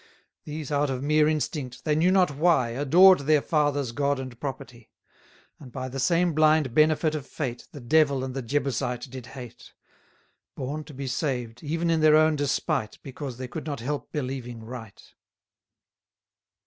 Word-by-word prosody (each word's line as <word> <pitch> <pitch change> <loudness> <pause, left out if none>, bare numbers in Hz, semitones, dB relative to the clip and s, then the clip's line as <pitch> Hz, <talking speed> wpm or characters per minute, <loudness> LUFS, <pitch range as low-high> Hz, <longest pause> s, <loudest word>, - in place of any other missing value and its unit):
These 150 -1 -6
out 145 0 +1
of 130 0 -3
mere 150 +1 +3
instinct, 145 -5 -3
they 155 - +2
knew 160 +4 +3
not 185 -4 +3
why, 145 -4 +2
Adored 165 +10 +6
their 150 +2 +3
fathers' 145 -4 0
God 140 +2 0
and 130 -3 -8
property; 130 -4 -7 0.7
And 130 -4 -12
by 130 0 -5
the 135 +1 -5
same 170 +5 +2
blind 155 -4 +3
benefit 155 +1 +3
of 150 -3 -5
fate, 125 -6 -5
The 145 - -10
Devil 140 0 +2
and 130 -1 -4
the 135 - -3
Jebusite 125 -1 -2
did 130 -2 -8
hate: 125 -3 -11 0.8
Born 145 +4 -4
to 150 - -12
be 135 +1 -5
saved, 125 -4 -3
even 165 +2 -1
in 160 -1 +2
their 155 -1 +6
own 155 0 +4
despite, 140 -4 -1
Because 135 -2 -7
they 130 0 -5
could 155 +4 -7
not 145 -4 -3
help 145 +5 -4
believing 125 -5 -5
right. 110 -3 -10
140 Hz, 165 wpm, -26 LUFS, 130-155 Hz, 0.8 s, Adored